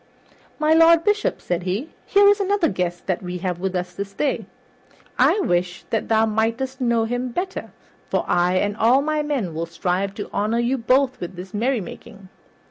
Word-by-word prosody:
"My 310 +1 +3
Lord 330 0 +6
Bishop," 420 0 +1
said 175 0 -2
he, 195 - -3 0.2
"here 405 0 +5
is 410 +1 +5
another 400 -2 +2
guest 180 -2 -3
that 185 -2 -1
we 180 -1 -5
have 180 -1 -3
with 190 0 -2
us 180 0 -3
this 200 +2 -6
day. 275 +7 -1 0.7
I - - +4
wish 180 - -1
that 225 - -1
thou 220 0 +3
mightest 230 +5 -1
know 235 -2 +2
him 245 +2 -2
better, 370 +9 -4 0.4
for - - 0
I 175 +1 +2
and 205 +2 0
all 245 +5 +4
my 305 0 0
men 270 - -2
will 165 +1 -3
strive 180 +3 -2
to 205 - -5
honor 215 +3 0
you 240 +3 0
both 260 +3 +2
at 175 +1 -6
this 180 +2 -9
merrymaking." 215 -3 -4
220 Hz, 185 wpm, -22 LUFS, 185-275 Hz, 0.7 s, Lord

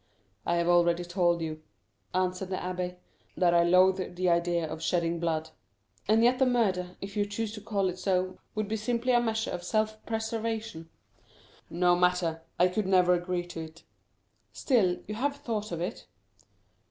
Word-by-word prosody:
"I 170 - +2
have 170 0 +1
already 175 0 +3
told 175 -1 +1
you," 155 -1 -5 0.5
answered 185 0 -1
the 190 - -1
abbé, 180 0 -3 0.4
"that 175 -2 +3
I 170 - +5
loathe 185 +1 +3
the 180 0 +1
idea 170 -1 +1
of 155 +1 -6
shedding 170 0 0
blood." 160 -1 -1 0.6
"And 220 +1 +4
yet 250 +2 +4
the 265 - +4
murder, 185 -7 0
if 200 0 -7
you 205 - +2
choose 210 +1 -3
to 210 - -8
call 200 -2 0
it 185 0 -4
so, 185 0 0 0.2
would 215 -1 -1
be 220 +2 -2
simply 240 +3 0
a 240 - +5
measure 225 -1 -1
of 175 0 -4
self 215 +3 -1
preservation." 220 -6 -3 0.8
"No 175 +1 +3
matter! 180 -2 +1 0.2
I 180 - +6
could 185 +2 -2
never 180 -1 +4
agree 175 0 -1
to 175 -1 -8
it." 160 +1 -12 0.7
"Still, 200 -10 +2
you 210 - -4
have 275 +6 -1
thought 215 -7 -4
of 170 -1 -3
it?" 185 +6 -5
185 Hz, 175 wpm, -29 LUFS, 175-215 Hz, 0.8 s, I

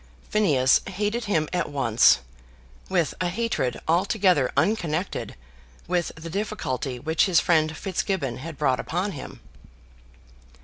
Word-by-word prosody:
Phineas 140 -12 +4
hated 210 +4 -2
him 160 -7 +1
at 180 -1 -1
once, 115 - +4 0.7
with 175 -5 +1
a 180 - +1
hatred 185 - -1
altogether 180 - +2
unconnected 180 -4 -1 0.5
with 175 -1 0
the 160 +1 -8
difficulty 155 - -3
which 160 +6 +1
his 180 -5 +4
friend 155 -2 +2
Fitzgibbon 180 - -2
had 155 +2 -8
brought 135 -4 +1
upon 180 +5 -2
him. 145 - -9
165 Hz, 120 wpm, -25 LUFS, 145-195 Hz, 0.7 s, Phineas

